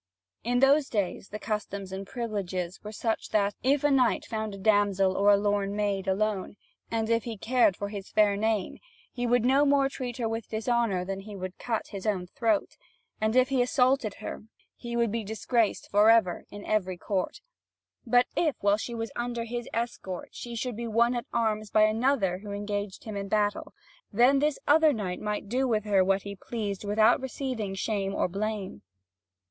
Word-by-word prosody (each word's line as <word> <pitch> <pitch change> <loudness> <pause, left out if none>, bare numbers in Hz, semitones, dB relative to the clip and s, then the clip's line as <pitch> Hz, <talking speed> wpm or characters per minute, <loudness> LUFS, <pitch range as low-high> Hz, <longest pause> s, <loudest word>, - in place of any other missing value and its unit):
In 245 +2 +1
those 275 +1 +4
days 200 -2 -2
the 210 - -5
customs 205 -3 -4
and 190 0 -6
privileges 195 -5 -4
were 210 - -6
such 220 +1 -2
that, 205 -1 +1
if 275 +2 +2
a 290 - +3
knight 255 -3 +3
found 220 -2 -4
a - - -9
damsel 195 -2 +2
or 205 0 +5
lorn 205 0 0
maid 200 -2 -1
alone, 200 0 -1 0.3
and 225 -1 -1
if 230 -1 +1
he 230 -3 -5
cared 235 -2 +2
for 200 - -4
his 200 -2 -7
fair 210 -2 +3
name, 215 -1 -1 0.3
he 245 -1 -2
would 245 0 +3
no 270 +3 +4
more 280 -1 +3
treat 250 -3 -5
her 235 -3 -1
with 225 -1 -4
dishonour 220 -4 0
than 195 +1 -4
he 205 +1 -9
would 185 -1 -6
cut 230 -3 -2
his 195 0 -6
own 190 -4 0
throat. 220 +2 -1 0.4
And 220 +2 +1
if 255 +1 +4
he 265 -2 +2
assaulted 250 -4 +2
her, - - -6 0.3
he 235 -1 -6
would 235 -2 +2
be 230 0 -2
disgraced 220 +1 0
for 210 +2 +5
ever 225 -6 +3
in 205 0 -9
every 190 -4 0
court. 190 0 -2 0.6
But 245 0 +4
if, 310 -5 +1
while 205 0 +3
she 235 +2 -5
was 225 0 -4
under 240 -1 -2
his 240 +1 -5
escort, 230 -6 -4
she 240 -1 -7
should 245 0 -3
be 235 +1 -4
won 235 +2 +3
at 240 -1 -3
arms 215 -2 0
by 215 - +4
another 215 -4 +2
who 205 0 -8
engaged 205 -1 -4
him 215 -2 -6
in 200 0 -4
battle, 205 0 -1 0.4
then 245 +6 +5
this 300 0 +1
other 310 +1 +5
knight 190 -6 -4
might 210 -1 -3
do 255 +5 0
with 215 -4 +1
her 200 -3 +4
what 195 +1 +1
he 200 0 -6
pleased 205 -1 -4
without 215 +3 +4
receiving 250 -6 -4
shame 195 -1 -2
or - - +1
blame. 200 - -4
215 Hz, 190 wpm, -28 LUFS, 200-240 Hz, 0.6 s, or